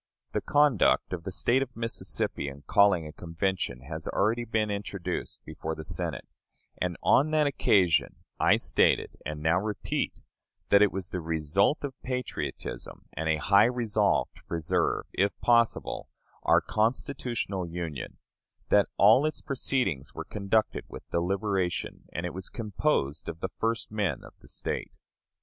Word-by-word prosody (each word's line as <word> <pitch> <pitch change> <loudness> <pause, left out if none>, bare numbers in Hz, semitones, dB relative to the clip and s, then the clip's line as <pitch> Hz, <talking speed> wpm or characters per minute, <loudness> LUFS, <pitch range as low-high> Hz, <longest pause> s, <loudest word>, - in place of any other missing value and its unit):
The - - -1
conduct 145 -10 +3
of 85 -2 -5
the 95 - -3
State 120 +7 +2
of 125 -2 -4
Mississippi 115 -9 -3
in 70 +1 -8
calling 95 0 +4
a 75 - -8
convention 85 -5 -2
has 80 +4 -7
already 115 +4 +1
been 110 -2 0
introduced 100 -2 -4
before 80 +1 -5
the 80 - -7
Senate; - - -3 0.5
and 90 -1 -1
on 145 +3 +5
that 155 -1 +3
occasion 95 - +3 0.2
I - - +5
stated, - - +2 0.2
and 75 0 -5
now 85 +3 +3
repeat, 105 +1 -2 0.5
that 100 - +6
it 105 - +5
was 95 -1 -5
the 90 - -3
result 80 - +1
of 140 -2 -3
patriotism, 125 -1 -5
and 80 0 -2
a 80 - +4
high 100 +7 +5
resolve 115 -4 +1
to - - -18
preserve, 80 -2 0
if 100 +1 0
possible, 115 -1 +2 0.3
our - - +4
constitutional 115 -4 -1
Union; 85 -6 -5 0.5
that 100 -1 +5
all 115 +9 +6
its 155 - -5
proceedings 125 - -1
were - - -5
conducted 105 +1 0
with - - -10
deliberation, 95 +1 -1
and 85 - -3
it 90 - -4
was 95 0 -6
composed 105 - -1
of 80 0 -7
the 95 - -3
first 115 -1 -1
men 100 -9 -1
of - - -13
the - - -18
State. - - -4
100 Hz, 150 wpm, -28 LUFS, 85-115 Hz, 0.5 s, that